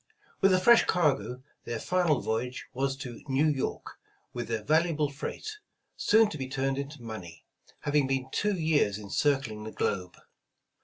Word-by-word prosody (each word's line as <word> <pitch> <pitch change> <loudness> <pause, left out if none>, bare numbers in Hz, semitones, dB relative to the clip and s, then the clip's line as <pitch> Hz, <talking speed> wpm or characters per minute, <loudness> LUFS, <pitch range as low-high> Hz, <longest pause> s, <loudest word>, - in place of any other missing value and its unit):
With 195 - +6
a 185 - +5
fresh 235 +5 +6
cargo, 135 -6 +1 0.2
their 120 -1 -3
final 175 -6 +2
voyage 120 +3 -2
was 135 +1 0
to 125 -3 -7
New 135 +2 +2
York, 140 -3 -3 0.3
with 120 - -4
their 115 -2 -2
valuable 155 0 +2
freight, 425 - -6 0.4
soon 220 +1 +4
to 155 - -6
be 130 - -3
turned 135 0 -1
into 140 -2 -6
money, 90 -8 -8 0.4
having 145 -2 +2
been 135 -1 -1
two 210 -1 +1
years 155 - +2
in 105 -2 -9
circling 135 -7 +1
the 110 - -6
globe. 90 -4 -2
135 Hz, 160 wpm, -29 LUFS, 120-155 Hz, 0.4 s, With